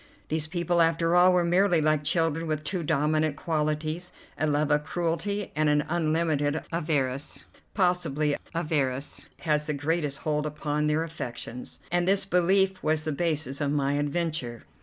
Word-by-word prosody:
These 155 0 0
people, 170 +1 +1
after 165 +1 +2
all, 180 +1 +7
were 180 -1 +3
merely 175 0 +3
like 155 -1 +2
children 165 +1 +1
with 155 -1 -2
two 175 +4 -2
dominant 155 -1 +1
qualities, 155 +2 -2 0.2
a 155 - 0
love 150 0 +1
of 150 0 +3
cruelty, 175 +5 -2
and 155 0 +2
an 150 0 +2
unlimited 155 -2 0
avarice, 145 -5 -2 0.3
possibly 165 -6 +1 0.2
avarice 145 -5 -2
has 150 -2 0
the 150 - -1
greatest 145 0 -1
hold 150 0 -1
upon 150 0 -1
their 155 +2 +1
affections, 125 -6 -7
and 175 0 +1
this 195 0 +3
belief 190 +1 +2
was 155 0 +1
the 155 - -1
basis 150 -3 -1
of 145 - +1
my 140 -1 +1
adventure. 145 -5 -2
155 Hz, 155 wpm, -27 LUFS, 150-170 Hz, 0.3 s, all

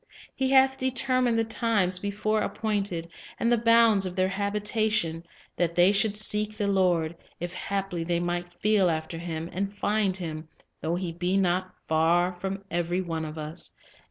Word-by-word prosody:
He 265 -1 -1
"hath 265 0 +4
determined 255 -2 +1
the 225 - +3
times 220 -5 +1
before 210 +2 -1
appointed, 200 -8 -2 0.3
and 230 - +1
the 240 - +4
bounds 230 -3 +5
of 180 - -7
their 185 -1 +2
habitation; 205 -4 0 0.3
that 170 -1 0
they 180 +2 +5
should 205 0 +2
seek 210 0 +2
the 205 -2 0
Lord, 175 -4 +1 0.2
if 175 +1 -4
haply 195 -2 -3
they 170 0 0
might 175 0 -3
feel 210 -3 +3
after 160 0 -3
Him, 165 -1 -4
and 200 +2 -3
find 205 -3 +1
Him, 160 -3 -6 0.3
though 165 +2 -1
He 180 -1 -3
be 180 +3 -1
not 185 0 0
far 170 +3 +2
from 190 +2 -5
every 175 +2 0
one 165 -3 -3
of 155 +1 -7
us." 155 +2 -6
190 Hz, 165 wpm, -27 LUFS, 175-210 Hz, 0.3 s, bounds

